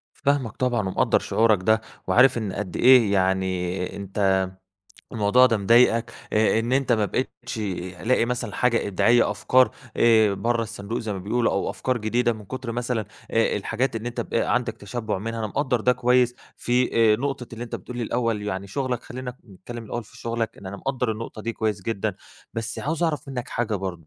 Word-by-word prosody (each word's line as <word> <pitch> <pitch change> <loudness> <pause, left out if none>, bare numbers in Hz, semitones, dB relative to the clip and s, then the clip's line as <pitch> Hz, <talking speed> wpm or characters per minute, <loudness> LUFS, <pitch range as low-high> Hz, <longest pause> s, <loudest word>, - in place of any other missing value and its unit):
فاهمك 140 -6 0
طبعًا 120 -6 0
ومقدَّر 95 - +2
شعورك 110 -4 +2
ده 110 +2 +3 0.3
وعارف 125 0 +5
إن 105 -4 -3
قد 95 -3 -5
إيه 125 -5 +6
يعني 95 -1 0
أنت 100 -1 +1 0.8
الموضوع 115 +3 +5
ده 115 -3 +2
مضايقك، 115 +2 +4 0.2
آآ 110 +1 +3
إن 120 +3 -1
أنت 135 -2 +2
ما 110 -2 +2
بقيتش 120 0 -4 0.5
لاقي 120 -1 +3
مثلًا 120 -3 -3
حاجة 115 -4 +1
إبداعية 115 +3 +3
أفكار 125 +5 +3 0.3
آآ 110 -3 +5
برا 115 +2 0
الصندوق 110 +1 -5
زي 110 -2 -3
ما 95 - -4
بيقولوا 115 +5 0
أو - - -1
أفكار 130 -2 -1
جديدة 120 +3 +1
من 110 -2 -9
كُتر 125 +2 -5
مثلًا 120 -2 -2 0.3
آآ 115 -1 +2
الحاجات 115 +4 -1
إن 115 +2 -5
أنت 120 - -3
ب - - -6
عندك - - +1
تشبُّع 105 0 -4
منها، 115 +3 -4
أنا 110 - -1
مقدَّر 125 0 0
ده 125 +3 +4
كويس 125 0 +2 0.2
في 125 +1 +1 0.2
آآ - - +3
نقطة 135 -1 -3
اللي 115 +1 -5
أنت 115 - -7
بتقول 125 - -9
لي 120 - -2
الأول 115 -2 -1
يعني 100 -1 -3
شغلك 125 +3 -2
خلينا 125 0 -7 0.2
نتكلم 115 +5 -9
الأول 120 +1 -5
في - - -17
شغلك؛ 115 -1 -2
لإن 95 - -12
أنا 100 - -6
مقدَّر 125 +1 -2
النقطة 110 0 -6
دي 115 - -2
كويس 105 -3 -2
جدًا، 105 -1 -2 0.4
بس 115 0 -4
عاوز 160 +4 -2
أعرف 150 -3 -1
منك 125 -3 -5
حاجة 115 -2 -1
برضو، 90 -5 -5
115 Hz, 190 wpm, -24 LUFS, 105-125 Hz, 0.8 s, إيه